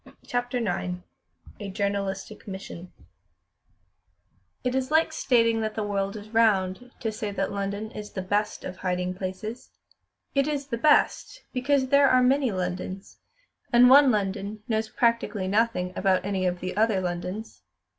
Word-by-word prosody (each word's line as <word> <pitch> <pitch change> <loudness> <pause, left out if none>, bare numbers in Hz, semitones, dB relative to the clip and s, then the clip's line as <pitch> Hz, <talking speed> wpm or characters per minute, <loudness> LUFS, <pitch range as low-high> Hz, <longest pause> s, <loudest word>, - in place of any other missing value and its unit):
CHAPTER 245 0 -2
IX 180 -5 -1 0.6
A 205 - -5
Journalistic 200 +1 -3
Mission 190 -2 -8 1.7
It 250 -1 0
is 260 0 -1
like 315 +1 +3
stating 230 -6 +2
that 215 -1 -2
the 220 - -1
world 200 -1 -2
is 215 0 -9
round 220 0 +2
to 225 - -1
say 210 0 -4
that 200 - -2
London 200 +2 -3
is 210 0 -8
the 190 - -3
best 205 +3 -1
of 185 - -6
hiding 180 0 -1
places. 190 +6 -6 0.6
It 275 0 +2
is 290 -2 -2
the 235 - -2
best, 305 - +2
because 260 0 +1
there 280 0 +6
are 255 0 +5
many 265 -1 +3
Londons, 185 +1 -4 0.5
and 245 +1 +7
one 280 0 +8
London 205 -1 -2
knows 220 -1 -1
practically 230 -4 0
nothing 200 -3 +1
about 190 -1 +1
any 190 -2 0
of 180 0 -2
the 185 0 -4
other 215 -1 +2
Londons. 180 +4 -5
210 Hz, 150 wpm, -26 LUFS, 190-245 Hz, 1.7 s, one